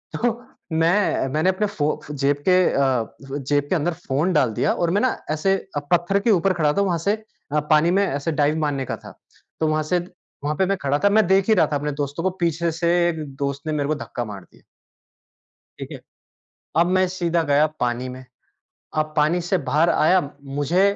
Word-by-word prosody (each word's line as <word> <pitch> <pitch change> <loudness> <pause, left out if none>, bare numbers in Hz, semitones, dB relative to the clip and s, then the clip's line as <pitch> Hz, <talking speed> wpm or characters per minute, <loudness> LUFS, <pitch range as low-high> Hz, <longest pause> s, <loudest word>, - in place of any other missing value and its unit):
तो 240 0 +1 0.4
मैं 165 -1 +2
मैंने 155 +5 +2
अपने 200 +3 0
फ़ो 150 -7 -1
जेब 145 0 +1
के 180 - +6 0.2
अ, 130 -4 0
जेब 145 +1 -1
के - - +2
अंदर 170 +1 0
फ़ोन 150 +7 +1
डाल 115 -8 +2
दिया - - +1
और 170 -1 0
मैं 205 - +2
ना 255 - +1
ऐसे 195 +5 +2 0.4
पत्थर 175 +3 +3
के 220 +3 +2
ऊपर 190 0 +3
खड़ा 150 -4 +1
था, 200 - +1
वहाँ 180 -4 +1
से 200 +6 +1 0.4
अ, 150 - +3
पानी 155 +3 +5
में 200 +2 +3
ऐसे 145 +4 -2
डाइव 150 +1 +1
मारने 140 -3 -1
का - - -4
था, - - -12 0.5
तो 160 - +1
वहाँ 155 0 +1
से 175 +4 +1 0.5
वहाँ 150 - 0
पे 190 - +3
मैं 195 -1 0
खड़ा 145 -1 0
था 200 - +6
मैं 215 0 +4
देख 190 0 +3
ही - - +7
रहा - - +4
था - - +2
अपने 150 +1 -3
दोस्तों 145 +4 -3
को, 190 - +2
पीछे 170 -2 -1
से 170 +1 -1 0.2
एक 160 -2 -4
दोस्त 140 +2 -4
ने 155 - -1
मेरे 145 -1 -1
को 155 - +1
धक्का 125 -4 -5
मार 100 -3 -8
दिया। - - -24 1.2
ठीक - - -7
है? - - -7 0.8
अब 170 +1 +4
मैं 185 0 +3
सीधा 175 -2 0
गया 145 +1 +3
पानी 125 +1 -1
में, 130 +1 -9 0.7
अब 155 0 0
पानी 155 +4 +3
से 175 +2 0
बाहर 155 +5 +3
आया 180 +3 +4 0.4
मुझे 175 +7 +2
160 Hz, 210 wpm, -22 LUFS, 145-185 Hz, 1.2 s, ही